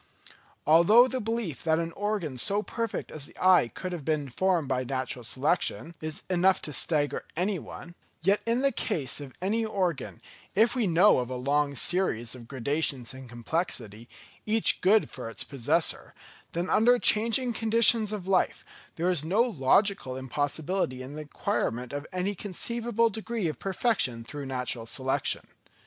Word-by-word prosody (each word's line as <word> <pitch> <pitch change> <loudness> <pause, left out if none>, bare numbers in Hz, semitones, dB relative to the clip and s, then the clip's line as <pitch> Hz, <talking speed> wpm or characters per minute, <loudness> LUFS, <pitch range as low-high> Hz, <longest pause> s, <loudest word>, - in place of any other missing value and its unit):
Although 170 +11 +6
the 260 0 -3
belief 220 - -3
that 160 -1 +2
an 165 0 -2
organ 200 -7 -2
so 200 - +1
perfect 230 0 -4
as 145 -2 -7
the - - -19
eye 185 -8 +5
could 185 +9 -6
have 170 -4 -5
been 150 -2 -1
formed 175 +2 +1
by 130 -1 0
natural 130 -1 -4
selection, 150 +7 -1
is 155 -1 -4
enough 185 +1 +3
to 150 - -4
stagger 145 0 0
any 185 +1 0
one; 175 +2 -10 0.3
yet 195 +4 +3
in 235 +3 +1
the 275 - +4
case 145 - -2
of 135 -3 -10
any 220 +4 +1
organ, 185 -8 -2 0.4
if 220 +3 +4
we 245 -6 0
know 180 0 +5
of 125 -1 -3
a 130 - -4
long 140 +3 0
series 155 -10 0
of 120 -3 -11
gradations 135 -1 -2
in 130 -1 -10
complexity, 120 - -3 0.4
each 220 +1 +2
good 210 +4 +4
for 125 -3 -7
its 115 - -3
possessor, 135 -5 -1 0.4
then 175 +2 -2
under 240 +6 +4
changing 235 +2 +2
conditions 225 -1 +4
of 205 -4 -4
life, 190 -1 +1 0.3
there 170 +2 -1
is 175 -5 +2
no 195 +9 +3
logical 195 - +1
impossibility 145 +2 -2
in 130 +2 -8
the 155 - -6
acquirement 145 - -2
of 145 +1 -5
any 185 +2 -1
conceivable 230 +4 -1
degree 220 -2 -3
of 155 - -4
perfection 190 - 0
through 140 +3 -7
natural 125 -3 -3
selection. 130 +3 -1
170 Hz, 160 wpm, -28 LUFS, 135-210 Hz, 0.4 s, Although